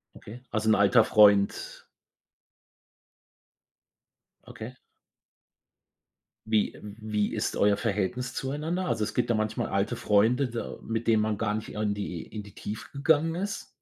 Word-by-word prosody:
Okay. 120 +4 -11
Also 110 0 -1
'n 110 - +6
alter 105 +3 +5
Freund? 100 -2 +3 2.6
Okay. 115 +3 -8 1.7
Wie 110 -1 +1
e - - -13
wie 105 0 -3
ist - - -2
euer 100 0 +3
Verhältnis 115 +4 -2
zueinander? 155 +7 -2
Also 115 -3 0
es - - -5
gibt 120 -1 0
da - - +3
manchmal 110 0 -1
alte 100 +1 0
Freunde, 115 +6 +2
da 115 0 -5
mit 115 +1 -3
denen 110 -2 +4
man 105 -2 -1
gar 105 -2 0
nicht 110 +1 -4
in 105 -1 -1
die 90 -5 -5
in 105 -1 -8
die 100 -1 -15
Tiefe 110 +2 -7
gegangen 160 +3 +2
ist. 200 +2 -4
110 Hz, 145 wpm, -27 LUFS, 105-125 Hz, 2.6 s, n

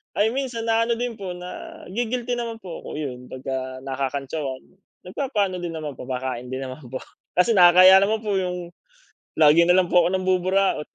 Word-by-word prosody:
ay 220 +2 +2
minsan 250 -3 -3
na 230 0 +2
ano 235 - +1
din 240 -2 -4
po, 185 -3 -5
na-gi-guilty 245 - -4
naman 230 -1 -5
po 175 -3 -7
ako, - - -10
yun 125 -4 -5
pagka 130 0 -5
nakakantsawan. 135 +1 -4 0.4
Nagpapaano 200 -2 -2
din 175 -1 -5
naman, 150 -4 -6
papakain 125 -1 -4
din 130 +1 -4
naman 130 +1 -8
po. 130 +2 -6 0.3
Kasi 180 +6 +3
nakakahiya 185 -1 +8
naman 215 +2 +1
po 205 -2 0
yung 180 -2 -4 0.7
lagi 155 +1 +6
na 180 - +6
lang 180 -2 +2
po 180 - +7
ako - - +2
nambuburaot. 185 -2 +1
180 Hz, 170 wpm, -23 LUFS, 135-220 Hz, 0.7 s, nakakahiya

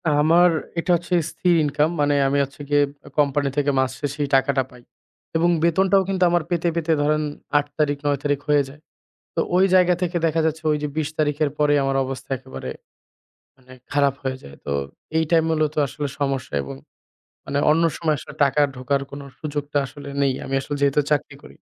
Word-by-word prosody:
আমার 160 +4 +5 0.3
এটা 180 - 0
হচ্ছে 175 +2 -4 0.2
স্থির 175 -1 +2
ইনকাম। 150 +1 +1
মানে 145 0 +3
আমি 140 +1 +1
হচ্ছে 140 +2 -8
গিয়ে 145 0 +4 0.2
আ - - -10
কোম্পানি 145 -1 +2
থেকে 145 0 +2
মাস 130 -1 +1
শেষে 145 0 -3
এই - - -8
টাকাটা 135 0 +2
পাই। 125 -1 -15 0.5
এবং 170 +2 +3
বেতনটাও 190 +3 +3
কিন্তু 190 -1 +1
আমার 175 -1 +2
পেতে, 175 -1 0
পেতে 165 -1 0
ধরেন 150 +1 +2 0.4
৮ 145 - +2
তারিখ 145 -1 +2
৯ 145 -1 +2
তারিখ 145 -1 +1
হয়ে 145 -1 +4
যায়। 145 +2 -15 0.5
তো - - 0 0.2
ওই 185 +1 +5
জায়গা 180 -1 +5
থেকে 175 -1 0
দেখা 165 0 +1
যাচ্ছে 160 0 -1
ওইযে 150 0 -1
২০ 155 -1 0
তারিখের 150 0 +1
পরেই 145 -1 +3
আমার 135 0 0
অবস্থা 130 0 -7
একেবারে 65 - -8 0.9
মানে 130 -1 -20 0.2
খারাপ 140 -2 +3
হয়ে 130 -1 -2
যায়। 70 - -11
তো - - -3 0.5
এইটাই 160 +1 +3
মূলত 155 -2 +1
আসলে 145 +2 -4
সমস্যা 135 - -2
এবং 70 0 -7 0.7
মানে 140 - -2
অন্য 165 +2 +3
সময় 155 -2 +1
আসলে - - -10
টাকা 140 +1 +3
ঢোকার 130 +2 -1
কোনো 140 0 -8
সুযোগটা 145 -1 -3
আসলে 140 +1 -10
নেই। 135 -1 +2
আমি 135 - -6
আসলে 145 +2 -4
যেহেতু 140 +1 +3
চাকরি 145 -3 0
করি। - - -14
145 Hz, 190 wpm, -22 LUFS, 140-160 Hz, 0.9 s, আমার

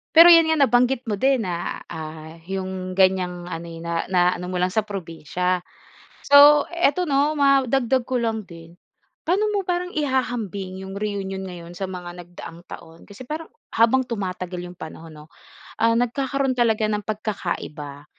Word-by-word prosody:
Pero 335 +2 +10
yun 330 -1 +7
nga 320 - +2
nabanggit 250 0 +2
mo 210 - 0
din 265 -1 +2
na, 175 -3 -4
ah, 160 +1 -8
yung 185 -1 -4
ganyang 180 -2 +1
ano 165 -1 -6
eh, 165 -1 -9
na 170 0 -2
naano 180 -1 +1
mo 180 0 -3
lang 180 0 +1
sa 215 +2 0
probinsiya. 180 -1 -2 0.7
So 290 +1 +8
eto, 345 0 +1
'no, 285 +2 +2
madagdag 270 -2 +3
ko 255 0 -1
lang 225 -2 -2
din 165 0 -13 0.5
paano 385 +5 +2
mo 405 - +1
parang 360 -1 -2
ihahambing 235 - -2
yung 190 +1 -8
reunion 200 -2 -3
ngayon 175 -2 -9
sa 195 - -3
mga 180 -2 -7
nagdaang 175 -1 -11
taon? 165 -2 -11
Kasi 225 +5 -12
parang 315 +2 -6 0.2
habang 230 +3 +4
tumatagal 185 -4 -4 0.2
yung - - -18
panahon 160 0 -9
'no, 150 0 -14 0.5
ah, 230 0 +3
nagkakaroon 265 +3 0
talaga 230 -3 +1
ng 210 -1 -1
pagkakaiba. 175 -9 -5
200 Hz, 160 wpm, -23 LUFS, 175-260 Hz, 0.7 s, Pero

